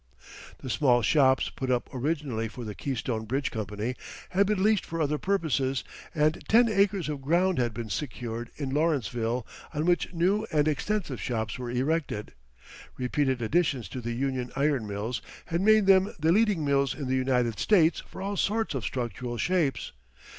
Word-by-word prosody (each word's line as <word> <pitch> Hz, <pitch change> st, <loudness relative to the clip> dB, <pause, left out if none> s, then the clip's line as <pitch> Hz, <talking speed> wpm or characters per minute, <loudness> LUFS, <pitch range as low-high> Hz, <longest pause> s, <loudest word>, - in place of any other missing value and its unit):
The 130 Hz, -, -8 dB
small 120 Hz, -3 st, +3 dB
shops 130 Hz, +1 st, +3 dB
put 130 Hz, -, -4 dB
up 125 Hz, -1 st, +1 dB
originally 135 Hz, -4 st, -2 dB
for 120 Hz, +2 st, -8 dB
the 105 Hz, -, -5 dB
Keystone 115 Hz, -3 st, -3 dB
Bridge 135 Hz, +5 st, -1 dB
Company 110 Hz, +2 st, -3 dB, 0.4 s
had 195 Hz, +2 st, +2 dB
been 205 Hz, -2 st, +1 dB
leased 215 Hz, -2 st, +3 dB
for 165 Hz, -, -5 dB
other 150 Hz, -1 st, 0 dB
purposes 145 Hz, -9 st, 0 dB, 0.3 s
and 155 Hz, +1 st, +1 dB
ten 235 Hz, +2 st, +6 dB
acres 200 Hz, -4 st, +2 dB
of 150 Hz, -2 st, -4 dB
ground 175 Hz, +5 st, +2 dB
had 120 Hz, -1 st, +1 dB
been 115 Hz, -1 st, -6 dB
secured 120 Hz, -1 st, -4 dB
in 140 Hz, -3 st, -4 dB
Lawrenceville 125 Hz, -6 st, 0 dB, 0.3 s
on 150 Hz, +2 st, 0 dB
which 175 Hz, 0 st, +2 dB
new 190 Hz, +5 st, +1 dB
and 150 Hz, -1 st, +2 dB
extensive 155 Hz, -, -1 dB
shops 110 Hz, 0 st, -2 dB
were 125 Hz, -1 st, -4 dB
erected. 130 Hz, -3 st, -1 dB, 0.6 s
Repeated 130 Hz, 0 st, 0 dB
additions 140 Hz, -1 st, +1 dB
to 130 Hz, -, -6 dB
the 120 Hz, 0 st, -3 dB
Union 130 Hz, 0 st, -2 dB
Iron 140 Hz, -5 st, +1 dB
Mills 105 Hz, +3 st, -3 dB, 0.2 s
had 170 Hz, +2 st, -1 dB
made 215 Hz, 0 st, +5 dB
them 190 Hz, +1 st, +5 dB
the 160 Hz, +1 st, +2 dB
leading 205 Hz, -5 st, +3 dB
mills 140 Hz, -2 st, +2 dB
in 140 Hz, -1 st, -5 dB
the 130 Hz, -, +1 dB
United 125 Hz, -4 st, +1 dB
States 175 Hz, -6 st, +4 dB
for -, -, -8 dB
all 200 Hz, +1 st, -2 dB
sorts 220 Hz, +1 st, 0 dB
of 135 Hz, -5 st, -3 dB
structural 120 Hz, 0 st, -3 dB
shapes. 155 Hz, -1 st, 0 dB
140 Hz, 170 wpm, -28 LUFS, 120-170 Hz, 0.6 s, ten